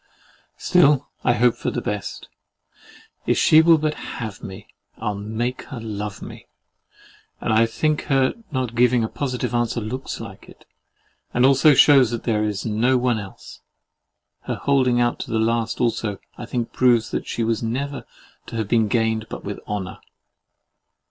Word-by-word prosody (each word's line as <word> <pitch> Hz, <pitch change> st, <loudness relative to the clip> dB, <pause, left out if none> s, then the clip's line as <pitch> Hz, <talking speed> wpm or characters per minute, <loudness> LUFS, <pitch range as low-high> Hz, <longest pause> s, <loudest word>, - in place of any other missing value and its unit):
Still 150 Hz, -6 st, +3 dB
I 125 Hz, -, +3 dB
hope 120 Hz, 0 st, +3 dB
for -, -, -3 dB
the -, -, -3 dB
best. 105 Hz, -2 st, -5 dB, 1.0 s
If -, -, +2 dB
she 155 Hz, -, +6 dB
will 165 Hz, 0 st, +6 dB
but 155 Hz, 0 st, -1 dB
HAVE 110 Hz, -8 st, -7 dB
me, 95 Hz, +2 st, -9 dB, 0.3 s
I'll 105 Hz, -2 st, -2 dB
make 110 Hz, +5 st, -3 dB
her 130 Hz, -5 st, -8 dB
LOVE 105 Hz, -2 st, -6 dB
me: -, -, -11 dB, 0.9 s
and -, -, -1 dB
I 115 Hz, +1 st, +4 dB
think 155 Hz, +6 st, -1 dB
her 135 Hz, -2 st, +2 dB, 0.2 s
not 130 Hz, -4 st, -2 dB
giving 120 Hz, 0 st, +3 dB
a -, -, 0 dB
positive 125 Hz, -2 st, -3 dB
answer 120 Hz, 0 st, 0 dB
looks 120 Hz, +5 st, -5 dB
like -, -, -10 dB
it, -, -, -17 dB, 0.7 s
and 120 Hz, +1 st, +4 dB
also 140 Hz, +2 st, +5 dB
shews 135 Hz, -3 st, +6 dB
that 120 Hz, -1 st, -4 dB
there 110 Hz, -3 st, 0 dB
is 105 Hz, -2 st, -2 dB
no 115 Hz, +4 st, +2 dB
one 125 Hz, -2 st, +1 dB
else. 100 Hz, -2 st, -11 dB, 0.9 s
Her -, -, -1 dB
holding 130 Hz, -3 st, +2 dB
out 120 Hz, 0 st, +1 dB
to -, -, -6 dB
the 115 Hz, -, 0 dB
last 115 Hz, 0 st, 0 dB
also, 115 Hz, -4 st, -1 dB, 0.2 s
I 120 Hz, -, -8 dB
think, 120 Hz, -1 st, -3 dB
proves 120 Hz, -3 st, +3 dB
that -, -, -3 dB
she 115 Hz, -, -2 dB
was 115 Hz, -1 st, 0 dB
never 135 Hz, +5 st, -3 dB, 0.4 s
to -, -, -8 dB
have 110 Hz, -2 st, -2 dB
been 110 Hz, 0 st, +2 dB
gained 110 Hz, 0 st, 0 dB
but -, -, -7 dB
with 100 Hz, 0 st, -5 dB
honour. 100 Hz, -3 st, -4 dB
120 Hz, 170 wpm, -22 LUFS, 110-130 Hz, 1.0 s, she